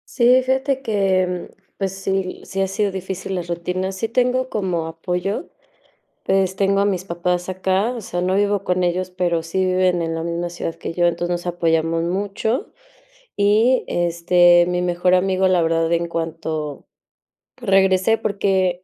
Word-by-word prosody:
Sí, 250 +1 +5
fíjate 265 +1 0
que, 190 -5 0 0.3
pues 195 -1 -1
sí, 195 -1 -3
sí 195 0 -3
han 190 - +1
sido 200 +1 -1
difícil 190 0 -5
las 175 -2 -3
rutinas. 180 +2 -3
Sí 225 - -1
tengo 250 +2 +1
como 180 -7 -2
apoyo. 180 - -3 0.7
Pues, 190 -1 +1
tengo 195 0 +2
a - - +2
mis 185 -3 -1
papás 180 0 -2
acá, 190 +6 0
o 230 - -6
sea, 175 -2 -4
no 185 +1 +1
vivo 205 -1 +1
con 180 -1 0
ellos, 180 +1 0
pero 175 -2 0
sí 185 +3 -1
viven 185 -2 +2
en 165 0 -2
la 165 - -3
misma 170 +1 -3
ciudad 165 -1 -4
que - - -6
yo, 175 0 +2
entonces 175 +1 -1
nos 175 0 -3
apoyamos 165 -1 +1
mucho 200 +7 -2 0.7
y, 215 +5 +3
este, 175 0 +4
mi 180 0 -1
mejor 180 +1 +2
amigo 190 0 +2
la 180 -2 +3
verdad, 165 0 +1
en 170 0 +1
cuanto 160 -3 -4 0.7
regresé 195 -1 +3
porque, 190 -3 0
185 Hz, 165 wpm, -21 LUFS, 175-195 Hz, 0.7 s, Sí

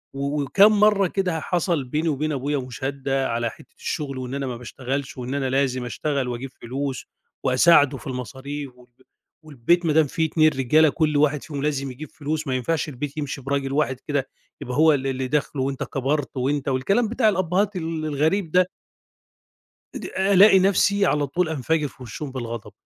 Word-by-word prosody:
و 140 +1 -1
وكام 200 +9 +5
مرّة 205 -2 +4
كده 180 -3 -1
ه - - -4
حصل 170 -4 0
بيني 155 +6 -1
وبين 155 +2 -1
أبويا 145 +1 -1
مُشادة 135 +2 -2
على 115 0 -1
حتّة - - -17
الشُغل 135 -3 -3
وإن 125 +1 -5
أنا 135 -1 -3
ما 120 -2 -4
باشتغلش 130 +3 -5
وإن 125 +2 -4
أنا 135 -2 -1
لازم 130 -2 0
أشتغل 140 +1 -2
وأجيب 125 +2 -5
فلوس 135 +2 -4 0.4
وأساعده 140 +1 +5
في - - -11
المصاريف 130 +3 -6
والب 125 -1 -20 0.5
والبيت 155 +4 +1
ما 150 - +2
دام 155 -2 +4
في 160 +3 0
2 155 0 +4
رجالة 150 +3 +3
كل 155 -1 +1
واحد 150 -1 +2
فيهم 145 -3 -6
ولازم 140 -2 -1
يجيب 145 +3 -9
فلوس، 155 0 -4
ما 130 - 0
ينفعش 150 +5 -1
البيت 145 +2 -6
يمشي 140 -2 -4
براجل 135 0 -2
واحد 135 -4 0
كده 140 -3 -1 0.3
يبقى 125 +3 -4
هو 155 0 +6
اللي 135 -1 -1
اللي 130 0 -3
داخله 140 -1 -1
وأنت 135 0 -2
كبرت 135 +1 -2
وأنت 140 +2 -1
والكلام 195 - +1
بتاع 235 -2 +3
الأبّهات 190 +1 0
ال 160 -2 -3
الغريب 155 +4 0
ده. 180 0 +4 1.3
إد - - -6
ألاقي 195 +1 +5
نَفْسي 200 +1 +3
على 145 -4 +1
طول 170 +4 0
أنَفجِر 155 +1 0
في 130 - -13
وِشّهم 135 +4 -6
بالغضب 115 -4 -6
145 Hz, 180 wpm, -23 LUFS, 130-160 Hz, 1.3 s, هو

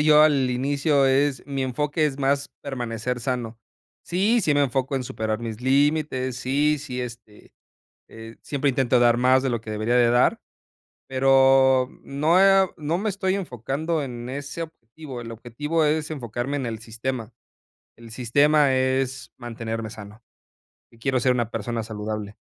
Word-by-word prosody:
yo 150 0 +6
al 140 -4 +3
inicio 140 +2 +1
es 135 +1 +1
mi 135 -1 -2
enfoque 150 +5 -1
es 140 -1 -4
más 140 +1 +1
permanecer 125 -2 -4
sano. 120 -2 -3 0.5
Sí, 205 +7 +2
sí 155 -6 +2
me 145 0 +3
enfoco 135 +1 -1
en 130 - -3
superar 110 -2 -3
mis 115 -1 -6
límites. 135 -1 +1
Sí 145 +4 +1
sí, 130 -3 -5
este, 115 -3 -10 0.6
eh, 115 0 -11
siempre 140 0 -1
intento 125 -1 +2
dar 120 -1 +4
más 130 +2 +4
de 135 - +1
lo 120 -2 -1
que 110 -1 -9
debería 110 +3 -1
de 120 -1 +4
dar. 120 +1 +3 0.7
Pero 135 -1 +4
no, 155 +6 +2
eh, 195 0 +6
o 190 - -3
no 160 +2 -2
me 215 +2 -1
estoy 190 -1 -1
enfocando 155 - -2
en 120 -2 -6
ese 145 +5 -5
objetivo. 135 -3 -9
El 115 0 -7
objetivo 150 +8 -2
es 150 +1 0
enfocarme 130 -1 -4
en 135 - -3
el 115 -1 -4
sistema. 115 +1 -5 0.6
El 115 -1 -13
sistema 140 +4 +3
es 130 0 -1
mantenerme 115 -2 -5
sano. 105 +1 -11 0.7
Y 115 - -20
quiero 130 +2 0
ser 130 - +3
una 120 -2 -1
persona 115 +1 -3
saludable, 105 -1 -5
130 Hz, 165 wpm, -24 LUFS, 120-145 Hz, 0.7 s, yo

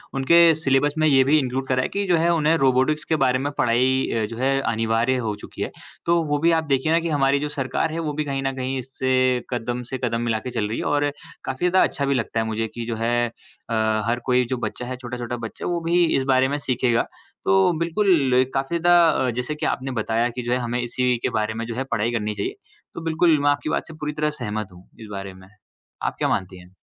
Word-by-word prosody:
उनके 165 +5 +6
सिलेबस 145 -1 +1
में 155 0 +3
ये 135 -3 +5
भी 150 +4 +4
इनक्लूड 130 0 -2
करा 130 0 +1
है - - 0
कि 200 0 -2
जो 180 - +4
है 170 +1 +2
उन्हें 160 0 +3
रोबोटिक्स 135 +2 +2
के 160 - +3
बारे 130 0 +2
में 145 +2 -2
पढ़ाई 130 +3 +2
अ, 110 -1 0
जो 115 +2 -7
है 135 +2 +1
अनिवार्य 115 +3 +1
हो 105 - -1
चुकी - - -10
है। - - -2 0.3
तो 170 0 +3
वो 145 -1 -1
भी 170 +3 +3
आप - - -4
देखिए 140 0 0
ना 165 - +4
कि 170 0 -3
हमारी 140 -1 +2
जो 150 +1 -3
सरकार 135 +2 -2
है 165 - -3
वो 155 -3 -2
भी 150 +1 -1
कहीं 135 -1 -2
न 135 0 -1
कहीं 130 0 -2
इससे 130 0 0
कदम 120 0 -3
से 130 - -2
कदम 115 -1 0
मिला 115 -2 0
के 125 - -6
चल 105 -2 -1
रही 110 - -3
है - - -2
और 145 0 +1 0.3
काफ़ी 135 +7 0
ज़्यादा 185 +1 +4
अच्छा 140 -4 -3
भी 140 - +1
लगता 115 -3 -1
है 110 - 0
मुझे 110 0 -2
कि 120 -1 -5
जो 115 -1 -3
है, 120 +1 +1 0.4
अ, 115 - -2 0.3
हर 120 +1 0
कोई 125 -1 +3
जो 130 - -1
बच्चा 125 0 -4
है, 130 +1 -4
छोटा-छोटा 120 -1 -5
बच्चा, - - -9
वो 175 -1 -1
भी 170 +2 +2
इस 135 - 0
बारे 130 0 +4
में 145 +2 -1
सीखेगा। 125 -4 +1 0.4
तो 190 -2 +4
बिल्कुल 170 -6 +2
एक 130 +1 +2
काफ़ी 135 +5 -1
ज़्यादा 175 0 +5 0.2
अ, - - +1
जैसे 125 +5 -3
कि 150 - -4
आपने 135 0 -1
बताया 115 0 0
कि 125 +1 -5
जो 120 - -3
है - - +2
हमें 120 0 -2
इसी 125 +1 0
के - - +1
बारे 105 +1 -1
में 115 +1 -4
जो 115 - -5
है 130 - -1
पढ़ाई 110 +3 0
करनी 105 -2 -2
चाहिए। 390 - -3 0.4
तो 170 - -7
बिल्कुल 165 -1 +2
मैं 145 - +3
आपकी 145 +1 0
बात - - -1
से 160 - -10
पूरी 150 -1 -4
तरह 150 0 0
सहमत 110 -3 -3
हूँ, 90 +1 -16
इस 110 - -9
बारे 100 -1 -6
में। 95 0 -15 0.6
आप - - -1
क्या - - +1
मानती 95 0 -2
हैं? 90 - -15
130 Hz, 255 wpm, -23 LUFS, 120-150 Hz, 0.6 s, उनके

